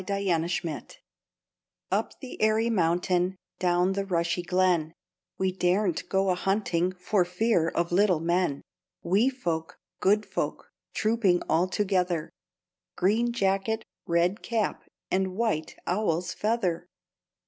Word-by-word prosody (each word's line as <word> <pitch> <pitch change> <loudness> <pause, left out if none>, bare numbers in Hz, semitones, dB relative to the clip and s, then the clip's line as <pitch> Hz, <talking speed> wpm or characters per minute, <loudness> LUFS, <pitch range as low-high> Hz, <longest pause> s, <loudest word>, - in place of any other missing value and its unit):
THE 200 0 -2 0.4
FAIRIES 160 -3 -6 0.9
Up - - -1
the 260 - -8
airy 220 +2 +3
mountain, 180 0 +1 0.2
Down 180 +1 +2
the 200 0 -1
rushy 175 -2 0
glen, 175 -3 +1 0.4
We 190 0 +1
daren't 180 0 0
go 195 0 +2
a - - +3
hunting 185 -1 0
For 180 +1 +1
fear 180 -1 +1
of 170 +1 -1
little 185 -2 +3
men; 170 -3 0 0.4
Wee 200 +9 +3
folk, 170 -12 -3 0.2
good 210 +2 +3
folk, - - -4 0.2
Trooping 215 -5 +2
all 170 +3 +2
together; 185 -4 0 0.6
Green 220 +6 +2
jacket, 200 0 0 0.2
red 175 +5 +1
cap, 225 -3 -2 0.2
And 190 0 0
white 210 -8 -1
owl's 180 -2 0
feather! 190 -6 -1
185 Hz, 120 wpm, -27 LUFS, 175-210 Hz, 0.9 s, airy